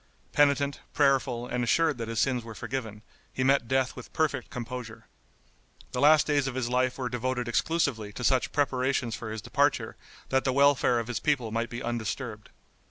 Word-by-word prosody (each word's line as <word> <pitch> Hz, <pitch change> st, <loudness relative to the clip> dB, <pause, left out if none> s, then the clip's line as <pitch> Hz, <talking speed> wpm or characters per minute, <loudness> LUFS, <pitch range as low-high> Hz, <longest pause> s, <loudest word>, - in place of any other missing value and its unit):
Penitent, 140 Hz, -1 st, +2 dB, 0.2 s
prayerful 135 Hz, -4 st, +2 dB
and 125 Hz, 0 st, -2 dB
assured 155 Hz, +2 st, +2 dB
that 115 Hz, -, -3 dB
his 115 Hz, 0 st, -2 dB
sins 125 Hz, -3 st, +1 dB
were 115 Hz, -1 st, -9 dB
forgiven, 115 Hz, -3 st, -5 dB, 0.3 s
he 130 Hz, -, -2 dB
met 135 Hz, -2 st, +3 dB
death 130 Hz, +1 st, +1 dB
with 125 Hz, -, -10 dB
perfect 145 Hz, -5 st, 0 dB
composure. 120 Hz, -2 st, -7 dB, 0.9 s
The 125 Hz, -, -2 dB
last 150 Hz, +1 st, +6 dB
days 145 Hz, -2 st, +1 dB
of 130 Hz, -, -4 dB
his 125 Hz, -2 st, -1 dB
life 125 Hz, 0 st, +1 dB
were 130 Hz, -2 st, -2 dB
devoted 125 Hz, 0 st, -2 dB
exclusively 120 Hz, -4 st, 0 dB
to 125 Hz, -, -6 dB
such 130 Hz, 0 st, +2 dB
preparations 130 Hz, -4 st, 0 dB
for 110 Hz, +1 st, -5 dB
his 110 Hz, -2 st, -6 dB
departure 140 Hz, +2 st, +1 dB, 0.3 s
that 135 Hz, 0 st, +2 dB
the 130 Hz, -, +1 dB
welfare 140 Hz, -3 st, +4 dB
of 115 Hz, -, -1 dB
his 120 Hz, -2 st, -2 dB
people 135 Hz, -7 st, 0 dB
might 115 Hz, +1 st, -1 dB
be 120 Hz, 0 st, -6 dB
undisturbed. 120 Hz, -1 st, -4 dB
125 Hz, 180 wpm, -28 LUFS, 120-140 Hz, 0.9 s, last